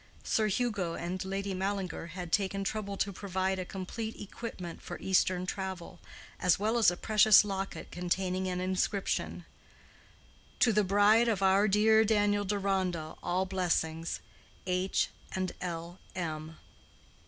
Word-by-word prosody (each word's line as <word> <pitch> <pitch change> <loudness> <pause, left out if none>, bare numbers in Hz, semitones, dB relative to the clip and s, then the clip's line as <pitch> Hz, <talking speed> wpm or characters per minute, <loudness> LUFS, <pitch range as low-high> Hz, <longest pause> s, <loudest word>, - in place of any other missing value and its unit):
Sir 215 -1 +1
Hugo 200 -6 -1
and 180 +2 -3
Lady 195 +1 -3
Mallinger 190 -2 -3
had 175 -2 -5
taken 195 0 +1
trouble 200 0 -3
to 200 +1 -1
provide 190 0 -1
a 185 - -3
complete 200 +5 -5
equipment 195 -4 -7
for - - -7
Eastern 185 -1 +1
travel, 190 -2 -5 0.4
as 180 -2 +3
well 220 +4 +1
as 225 - +6
a 175 - -3
precious 215 0 +6
locket 195 -1 -4
containing 185 +1 -1
an 180 -1 -2
inscription—"_To 190 +4 -3
the 210 0 +3
bride 205 +4 +5
of 205 -4 +1
our 195 +2 +5
dear 220 +2 +5
Daniel 205 -1 +2
Deronda 190 -5 -1
all 180 +2 0
blessings. 170 -3 -1 0.4
H. 185 +1 +1 0.3
and 185 -1 -1
L. 170 0 -5 0.2
M. 160 -2 -4
190 Hz, 130 wpm, -31 LUFS, 180-205 Hz, 0.4 s, as